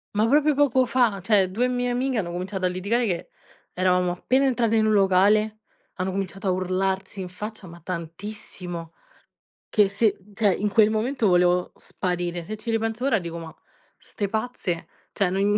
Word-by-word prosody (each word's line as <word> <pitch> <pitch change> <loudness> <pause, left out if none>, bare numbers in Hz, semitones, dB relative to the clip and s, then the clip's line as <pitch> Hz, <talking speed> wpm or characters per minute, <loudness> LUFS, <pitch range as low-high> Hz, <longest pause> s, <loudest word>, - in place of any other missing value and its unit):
Ma 215 +2 +3
proprio 300 +4 +4
poco 265 -3 +3
fa, 235 -6 +1
cioè, 195 -2 +3
2 240 +7 0
mie 245 0 0
amiche 255 +1 0
hanno 175 -5 -2
cominciato 185 +2 -3
a - - +4
litigare 200 +7 0
che 175 -3 -2 0.4
eravamo 180 -1 +2
appena 255 +9 +1
entrate 235 -4 +2
in 220 -1 +3
un 215 - +3
locale, 210 +2 +3 0.3
hanno 185 +1 -2
cominciato 195 +1 -4
a - - +3
urlarsi 190 +1 -1
in 180 - -6
faccia, 210 +3 -7
ma 170 0 -12
tantissimo. 175 -1 -7 0.8
Che 210 -3 +3
se 200 +1 +1 0.2
cioè 205 -2 +3
in 210 - -1
quel 215 0 +5
momento 225 +2 0
volevo 180 0 +3
sparire. 175 -1 -3
Se 215 - -5
ci 220 +2 -5
ripenso 225 +1 -1
ora 260 -6 +3
dico: 170 -2 -6
"Ma 165 -1 -8 0.4
'ste 200 -2 -5
pazze? 215 -6 -3 0.2
Cioè 195 -3 +1
non 200 +2 +2
200 Hz, 175 wpm, -24 LUFS, 180-225 Hz, 0.8 s, quel